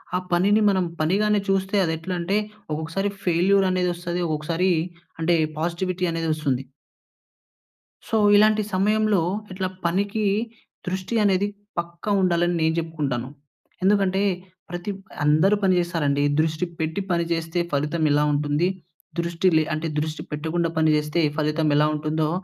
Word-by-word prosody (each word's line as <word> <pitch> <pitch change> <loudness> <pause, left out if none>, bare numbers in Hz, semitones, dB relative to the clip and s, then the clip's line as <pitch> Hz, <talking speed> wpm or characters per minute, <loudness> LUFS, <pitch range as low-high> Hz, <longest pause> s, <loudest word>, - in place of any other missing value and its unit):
ఆ - - +3
పనిని 200 +5 +3
మనం 190 -2 +1
పనిగానే 205 +6 +2
చూస్తే, 195 +1 +1
అదెట్లంటే 175 +4 -1 0.3
ఒక్కొక్కసారి 165 +6 -2
ఫెయిల్యూరనేదొస్తది, 180 -1 +1
ఒకొక్కసారి 165 +4 0 0.5
అంటే 170 +1 +3 0.2
పాజిటివిటీ 180 +2 -1
అనేదొస్తుంది. 155 -5 -1 1.4
సో, 225 - 0 0.2
ఇలాంటి 215 +1 +5
సమయంలో, 210 0 +2 0.3
ఇట్లా 185 0 -2 0.2
పనికీ 200 +5 0 0.6
దృష్టి 185 +5 -3
అనేది 195 0 +2 0.3
పక్కా 170 +4 -5
ఉండాలని 175 -1 +2
నేను 160 0 +2
చెప్పుకుంటాను. 140 -7 -3 0.5
ఎందుకంటే, 195 -1 +3 0.5
ప్రతి 175 +4 -4 0.3
అందరూ 155 +8 +4
పని 185 -1 +4
చేస్తారండి. 150 -5 0 0.2
దృష్టి 160 +2 +1
పెట్టి 160 +5 -1
పని 170 -1 +2
చేస్తే 165 +1 -2
ఫలితం 150 +3 0
ఎలా 145 +1 +3
ఉంటుంది, 145 +3 +1 0.5
దృష్టి 170 +2 0
లే 155 - +4
అంటే 155 +1 -2
దృష్టి 155 0 -3
పెట్టకుండా 160 +3 -1
పని 160 0 +3
చేస్తే 150 +2 0 0.2
ఫలితం 155 +1 +1
ఎలా 150 +1 +4
ఉంటుందో, 155 +1 -1
170 Hz, 120 wpm, -24 LUFS, 155-190 Hz, 1.4 s, ఇలాంటి